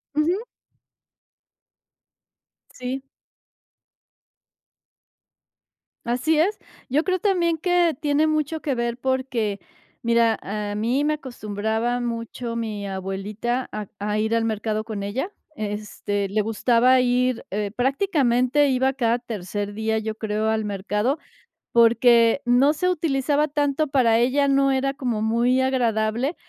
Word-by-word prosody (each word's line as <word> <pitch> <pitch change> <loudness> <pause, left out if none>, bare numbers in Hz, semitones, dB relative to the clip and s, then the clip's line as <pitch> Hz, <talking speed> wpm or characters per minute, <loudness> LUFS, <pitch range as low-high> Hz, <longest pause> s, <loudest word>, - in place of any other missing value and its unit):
Ujú. 325 +5 +2 2.4
Sí. 260 +2 -5 3.0
Así 275 +7 +1
es. 400 +6 +2 0.3
Yo 295 +5 +2
creo 370 -1 0
también 345 -5 +1
que 350 -2 +2
tiene 300 +1 +2
mucho 310 0 -1
que 275 -4 -1
ver 235 0 -2
porque, 255 -6 -1 0.4
mira, 230 -1 +3
a 205 0 -4
mí 240 +7 0
me 305 0 +1
acostumbraba 225 -2 -2
mucho 230 0 -4
mi 215 -3 -4
abuelita 195 +6 -3
a 210 -2 -5
a 210 +1 -1
ir 220 +1 +1
al 225 0 +1
mercado 215 0 -2
con 215 -3 -5
ella. 260 - -3 0.2
Este, 205 -2 -3
le 215 +1 +1
gustaba 240 +4 +3
ir, 250 0 +1
eh, 205 0 -2
prácticamente 270 -1 +2
iba 265 +1 +2
cada 235 -3 +1
tercer 205 -3 -5
día, 220 +1 -1
yo 220 0 -3
creo, 215 0 -2
al 220 -1 0
mercado, 210 +7 -1 0.6
porque 235 +1 +5
no 250 +5 +4
se 365 +4 -1
utilizaba 300 -3 +1
tanto 290 +1 0
para 245 -5 +3
ella, 275 +4 +2
no 275 0 +3
era 275 +1 0
como 245 -6 -2
muy 240 +3 +2
agradable 240 +1 0
240 Hz, 120 wpm, -23 LUFS, 220-275 Hz, 3.0 s, porque